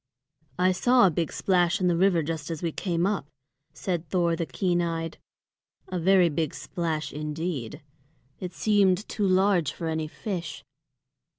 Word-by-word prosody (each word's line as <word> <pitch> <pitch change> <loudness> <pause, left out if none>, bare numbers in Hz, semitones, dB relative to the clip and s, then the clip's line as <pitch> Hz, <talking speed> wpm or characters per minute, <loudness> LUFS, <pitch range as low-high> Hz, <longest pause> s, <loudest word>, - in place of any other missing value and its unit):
"I 185 +1 +3
saw 245 +5 +4
a 185 - +4
big 165 +1 -1
splash 175 -3 +2
in 185 - +2
the 175 - +3
river 175 -2 +3
just 155 0 -4
as 165 -1 -5
we 165 - 0
came 170 0 -1
up," 200 -6 -1 0.4
said 175 -4 -3
Thor 170 -1 +2
the 165 0 -3
keen 175 -2 0
eyed, 165 -1 -3 0.7
"a 185 - -2
very 185 +1 +5
big 155 -1 -2
splash 155 +2 -3
indeed. 150 -4 -4 0.6
It 180 -1 -5
seemed 205 -2 +2
too 205 -2 -1
large 185 -5 +3
for 165 - -7
any 160 -1 -2
fish." 170 -3 -5
175 Hz, 160 wpm, -26 LUFS, 160-185 Hz, 0.7 s, very